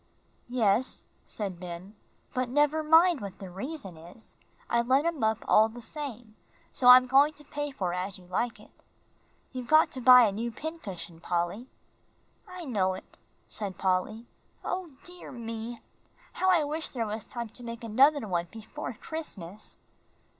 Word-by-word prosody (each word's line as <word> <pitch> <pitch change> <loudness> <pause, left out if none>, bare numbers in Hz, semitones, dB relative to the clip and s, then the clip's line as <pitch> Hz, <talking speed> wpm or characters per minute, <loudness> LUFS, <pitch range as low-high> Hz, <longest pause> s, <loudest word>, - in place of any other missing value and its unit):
"Yes," 235 0 +1 0.2
said 195 -5 -5
Ben, 180 +3 -8 0.4
"but 255 -1 -1
never 295 +4 +2
mind 325 0 +5
what 195 -2 -7
the 190 -2 -9
reason 195 - -6
is; 175 +8 -14 0.3
I 235 - +2
let 260 +5 +2
him 335 -7 -1
up 220 0 +1
all 220 +1 +6
the 235 +2 -10
same, 245 -6 -6 0.4
so 250 - +1
I'm 250 0 +10
going 275 +4 +5
to 295 - -15
pay 290 0 -4
for 185 -10 -3
'As 185 +2 -3
You 185 - -16
Like 225 +6 -2
It.' - - -17 0.8
You've 255 -2 -6
got 310 +3 +5
to 260 - -6
buy 250 0 +9
a 215 - +3
new 225 +4 -3
pincushion, 195 - -7
Polly." 175 +8 -2 0.8
"I 365 -2 -8
know 190 -8 +1
it," - - -13 0.3
said 200 -4 -4
Polly. 190 +5 0 0.4
"O 365 -2 -3
dear 355 0 -9
me! 230 -1 -6 0.5
How 375 - +1
I 350 -4 +5
wish 310 +2 -3
there 235 -3 -2
was 215 +1 -4
time 235 -2 -6
to 235 - -12
make 230 0 -7
another 265 +3 +4
one 175 -2 -1
before 225 +2 -7
Christmas." 215 - -7
235 Hz, 160 wpm, -29 LUFS, 195-290 Hz, 0.8 s, I'm